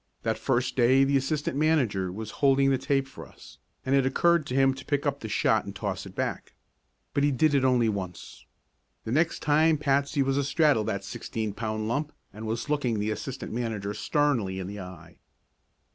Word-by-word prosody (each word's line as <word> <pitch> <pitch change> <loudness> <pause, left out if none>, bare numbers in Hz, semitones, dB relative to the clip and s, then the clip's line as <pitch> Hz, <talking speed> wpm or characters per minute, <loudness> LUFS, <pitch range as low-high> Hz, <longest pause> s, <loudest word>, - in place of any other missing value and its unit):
That - - -1
first 125 -1 0
day 130 +2 +5
the 140 +1 +2
assistant 135 +1 -1
manager 130 - +1
was 110 +3 -6
holding 135 -1 +4
the 135 - +1
tape 135 0 0
for 135 - -11
us, - - -16 0.3
and 130 - 0
it 135 -1 +4
occurred 170 +4 +2
to 125 - -3
him 135 0 +4
to 135 0 -10
pick 145 -1 -1
up 140 -1 0
the 110 - -7
shot - - +2
and - - -8
toss - - -4
it - - -13
back. - - -4 0.6
But 140 - +1
he 145 - +4
did 145 +3 +2
it 140 -2 +3
only 125 -3 +3
once. 95 -4 -6 0.6
The 110 - -5
next 160 +6 +1
time 155 +1 +4
Patsy 140 0 +1
was 135 0 0
astraddle 140 -2 +3
of 105 - -4
that 100 0 -2
sixteen 105 +2 -4
pound 110 0 -3
lump 145 +6 -2 0.2
and 110 +2 -7
was 115 +4 -3
looking 140 -7 0
the 105 +1 -1
assistant 135 +4 -5
manager 110 -4 -3
sternly 120 -6 0
in 95 - -4
the 100 +2 -7
eye. 90 -2 -11
130 Hz, 200 wpm, -27 LUFS, 110-140 Hz, 0.6 s, day